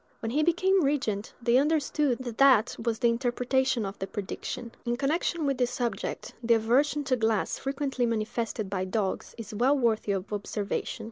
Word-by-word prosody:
When 225 - -3
he 295 +5 +2
became 360 +3 +3
regent, 260 -8 -1
they 235 0 +3
understood 295 -3 +1
that 240 -3 -6
that 265 -6 +5
was 230 -1 0
the 235 0 +3
interpretation 245 0 +1
of 195 +1 -6
the 195 - -3
prediction. 230 +4 -5
In 240 -1 -1
connection 310 +3 0
with 275 -2 0
this 245 -1 +2
subject, 240 -2 -3
the 235 -1 +4
aversion 270 +7 +2
to 260 -2 +1
glass 220 -3 0
frequently 270 -2 -1
manifested 225 -1 -2
by 190 -1 -2
dogs 195 0 -2
is 220 -2 -8
well 255 +7 +3
worthy 225 -5 +1
of 195 +2 -4
observation. 205 0 -3
240 Hz, 175 wpm, -28 LUFS, 220-275 Hz, -, that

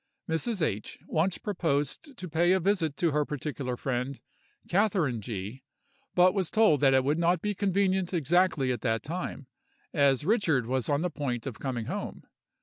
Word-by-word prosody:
Mrs. 175 +4 -1
H. 105 -8 -2
once 170 +4 0
proposed 175 - -2
to 185 - -6
pay 170 +3 +3
a 190 - +3
visit 175 -5 0
to 170 -2 +2
her 150 +1 +2
particular 140 -3 -4
friend, 130 +1 -2 0.5
Catherine 180 - +1
G——, 105 +4 -6 0.5
but 180 +1 +6
was 190 -4 -1
told 215 -10 +4
that 135 -2 +5
it 130 - +4
would 145 +4 +1
not 170 +1 +3
be 210 +4 -1
convenient 190 -2 +1
exactly 170 -4 +2
at 125 - -3
that 115 -3 0
time, 165 -3 -5 0.5
as 140 -2 +3
Richard 170 - +2
was 130 +2 -1
on 145 +2 +1
the 180 - -1
point 130 -5 -3
of 130 -5 -6
coming 125 -5 -3
home. - - -5
155 Hz, 170 wpm, -28 LUFS, 130-185 Hz, 0.5 s, but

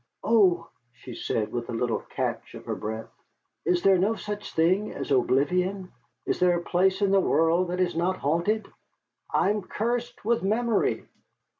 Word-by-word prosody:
"Oh!" 185 -7 +3 0.3
she 120 +1 -11
said, 110 -1 -2
with 120 0 -4
a - - -3
little 115 0 0
catch - - -4
of - - -10
her - - -2
breath, 110 +1 -5 0.5
"is 175 0 +1
there 195 -2 +5
no 210 +5 +2
such 210 -1 -6
thing 185 +6 +2
as - - -6
oblivion? 180 +9 +1 0.3
Is - - -1
there 180 -1 +4
a 175 - -5
place 190 +3 +2
in 195 - +3
the 195 - +5
world 170 +1 +2
that 180 +1 -3
is 180 -2 +1
not 180 +3 0
haunted? 170 +9 0 0.6
I 200 - +3
am 210 0 -1
cursed 235 +4 -3
with 235 +1 +2
memory." 220 +3 0
180 Hz, 170 wpm, -26 LUFS, 165-205 Hz, 0.6 s, there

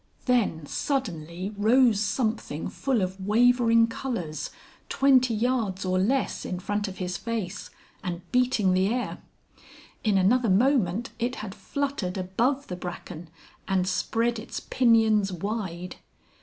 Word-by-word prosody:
Then 220 - +1
suddenly 185 - -3
rose 225 +1 +4
something 215 - -1
full 260 -7 0
of 190 +1 -4
wavering 230 +2 +4
colours, 230 - -4 0.4
twenty 255 -4 +4
yards 220 -5 0
or 185 0 +1
less 255 +8 0
in 180 - -3
front 205 +3 -2
of 190 - -7
his 180 -1 -3
face, 210 -4 -4 0.3
and 175 -2 -4
beating 245 -6 +2
the 185 +1 +3
air. 245 +3 -2 0.8
In 210 -3 +3
another 225 +5 +3
moment 225 -1 +2
it 245 +2 -1
had 210 -2 -6
fluttered 210 -2 -3
above 235 +10 0
the 180 - -5
bracken 175 -2 -7 0.4
and 190 -1 +1
spread 230 +5 0
its 220 - -6
pinions 220 -5 +3
wide. 185 -1 -4
210 Hz, 130 wpm, -26 LUFS, 185-245 Hz, 0.8 s, rose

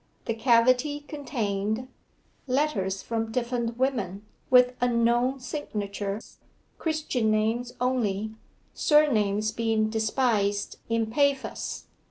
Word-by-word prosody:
The 230 - 0
cavity 250 +5 +3
contained 235 -6 -3 0.6
Letters 250 -9 0
from 225 -1 -2
different 235 -1 -2
women, 215 -7 -1 0.2
with 250 0 +6
unknown 240 +2 +2
signatures, 205 -6 -5 0.4
Christian 310 -8 0
names 225 +3 0
only 220 -4 0 0.4
(surnames 215 -9 +3
being 220 -1 0
despised 220 -3 0
in 230 0 +1
Paphos). 280 +1 0
230 Hz, 90 wpm, -27 LUFS, 215-255 Hz, 0.6 s, with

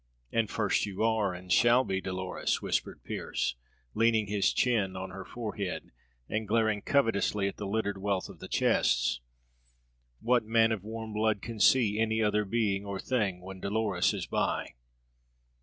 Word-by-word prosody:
"And 115 -2 +1
first 105 -1 +1
you 100 +1 -3
are, 110 -3 +2
and 90 0 -3
shall 120 +5 +5
be, 95 -5 -2
Dolores," 95 -1 -2
whispered - - -2
Pearse, 60 -1 -2 0.4
leaning 115 -1 +3
his 100 0 +1
chin 105 -7 +1
on 95 0 -5
her 95 0 -7
forehead 105 -5 -5 0.4
and 110 0 -2
glaring 110 -1 +2
covetously 105 -7 +1
at 100 - -5
the 105 - -4
littered 100 -1 -1
wealth 100 -1 -1
of - - -12
the - - -8
chests. - - +2 1.0
"What 120 0 +2
man 115 +1 +3
of 105 -4 -2
warm 110 0 -6
blood 110 -1 +1
can 115 -1 -6
see 110 -2 +4
any 110 0 +1
other 105 -1 +2
being 100 -2 0
or 100 -1 -5
thing 100 -8 -1
when 95 +1 -9
Dolores 100 -2 +1
is - - -4
by?" - - -1
105 Hz, 160 wpm, -30 LUFS, 95-110 Hz, 1.0 s, shall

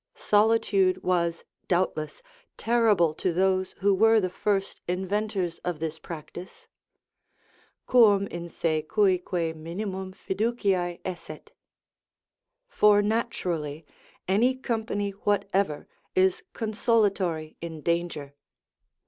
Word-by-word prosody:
Solitude 205 -3 +2
was, 170 -2 0 0.2
doubtless, 175 - -1 0.3
terrible 215 -9 +3
to 180 - -1
those 185 +1 +1
who 200 +1 +4
were 225 +3 +5
the 185 -3 -1
first 195 0 -1
inventors 190 -1 -2
of 175 -2 -3
this 160 0 -4
practice: 170 +3 -10 1.2
"Quum 210 -5 +5
in 170 -3 -7
se 160 -1 -1
cuique 180 -5 +1
minimum 185 +4 -5
fiduciae 190 -3 -1
esset," 185 -2 -7 1.2
for 210 - +4
naturally 175 -9 -2 0.4
any 230 +7 +3
company 220 -5 -2
whatever 200 -5 -1 0.3
is 185 0 +3
consolatory 205 -8 0
in 165 -2 -6
danger. 170 -4 -2
190 Hz, 95 wpm, -26 LUFS, 170-210 Hz, 1.2 s, were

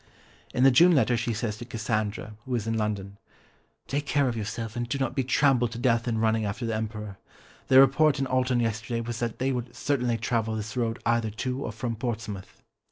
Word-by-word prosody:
In 125 - +1
the 135 - +7
June 175 +8 +6
letter 125 -3 +3
she 115 +1 -1
says 110 -1 -2
to 120 - -7
Cassandra, 110 -2 -2
who 130 - -5
was 115 -4 -1
in 115 0 -1
London, 100 -2 -3 0.7
"Take 145 +1 -2
care 140 -2 +2
of 120 - -1
yourself 110 +1 -4
and 120 0 -3
do 140 - -1
not 130 -2 -1
be 135 - +1
trampled 125 -2 +2
to - - -6
death 120 -1 +1
in 115 -2 0
running 110 0 +2
after 105 +4 -3
the 115 - -1
Emperor. 105 -2 -4 0.5
The 130 - +7
report 140 +3 +5
in 135 - 0
Alton 130 -1 +1
yesterday 115 +1 -2
was 115 0 -4
that 115 -2 -2
they 130 +1 0
would 120 -1 -4
certainly 125 -5 0
travel 115 -1 -1
this 110 0 -5
road 115 -2 -1
either 115 -1 +2
to 130 +5 -3
or - - -3
from 115 +2 -3
Portsmouth." 110 -4 -5
115 Hz, 215 wpm, -27 LUFS, 110-130 Hz, 0.7 s, the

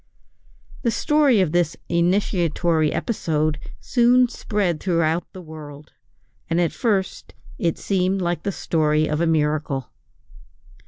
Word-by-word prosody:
The 240 - +1
story 285 -3 +3
of 175 -5 +1
this 175 -1 0
initiatory 170 -3 +1
episode 155 -8 -1 0.2
soon 245 0 +3
spread 200 -8 -2
throughout 165 -2 0
the 185 - -10
world, 150 -2 -11 0.6
and 165 - +1
at 170 -3 +1
first 200 -6 -2 0.2
it 170 -1 0
seemed 190 0 0
like 175 -1 -1
the 200 - -2
story 155 -3 +1
of 150 +1 -1
a 170 - +2
miracle. 150 -4 0
170 Hz, 120 wpm, -22 LUFS, 155-195 Hz, 0.6 s, story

